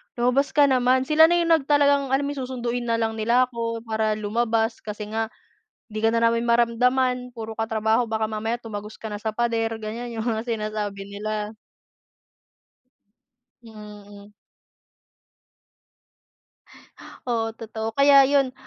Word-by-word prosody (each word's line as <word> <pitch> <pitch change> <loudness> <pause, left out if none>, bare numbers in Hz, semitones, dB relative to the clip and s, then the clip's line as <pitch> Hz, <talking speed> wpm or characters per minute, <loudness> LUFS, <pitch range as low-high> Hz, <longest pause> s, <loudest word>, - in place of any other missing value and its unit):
"Lumabas 250 +5 +1
ka 290 - +6
naman." 255 0 +3
Sila 315 +3 +6
na 345 - +2
'yong 340 -1 +1
nag 315 -4 +3
talagang 285 -2 +3
alam 280 - 0
mo 285 - -2
'yong 265 -3 -5
susunduin 245 -1 -3
na 230 - +1
lang 225 -1 -2
nila 235 +3 +3
ako 230 -1 -4
para 220 -1 -1
lumabas, 225 +1 -1
kasi 210 0 -7
nga, 225 0 -1 0.6
"'Di 215 - -5
ka 225 +1 +2
na 230 - +1
namin 230 +1 +2
maramdaman. 250 +2 +1
Puro 225 -1 -7
ka 225 - 0
trabaho. 220 +2 +1
Baka 220 0 -2
mamaya 225 +3 -3
tumagos 210 -1 -7
ka 220 - -8
na 205 - -5
sa 220 0 -4
pader." 230 -1 0
Ganiyan 235 +2 -5
'yong 225 +1 -4
mga 230 - -6
sinasabi 215 -3 -3
nila. 210 +2 -5 2.1
Mm. 210 -2 -13 2.9
Oo, 225 -2 -1
totoo. 225 0 -6
Kaya 280 0 +7
'yon. 275 -2 +2
230 Hz, 145 wpm, -24 LUFS, 220-250 Hz, 2.9 s, Kaya